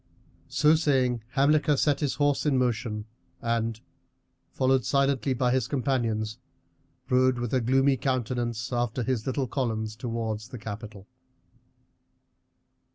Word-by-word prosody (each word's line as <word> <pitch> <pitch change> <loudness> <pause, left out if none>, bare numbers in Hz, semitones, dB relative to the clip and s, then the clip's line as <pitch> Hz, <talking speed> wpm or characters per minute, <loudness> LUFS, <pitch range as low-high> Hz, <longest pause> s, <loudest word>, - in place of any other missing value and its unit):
So 150 +2 +4
saying 130 -7 +2
Hamilcar 145 +1 +3
set 145 0 +2
his 145 -3 -1
horse 145 -1 +1
in 140 -3 +3
motion 115 -4 -1 0.3
and, 115 -1 -1 0.7
followed 130 -1 +2
silently 140 0 +1
by 125 0 +1
his 125 -2 +1
companions, 120 -5 -1 0.7
rode 130 -1 +3
with 120 0 -3
a 130 - +3
gloomy 135 +3 +3
countenance 120 -1 -2
after 120 0 -1
his 125 -2 -2
little 135 0 0
columns 110 -4 -2
towards 115 -2 -3
the 125 - -8
capital. 105 -2 -8
125 Hz, 120 wpm, -27 LUFS, 115-135 Hz, 0.7 s, So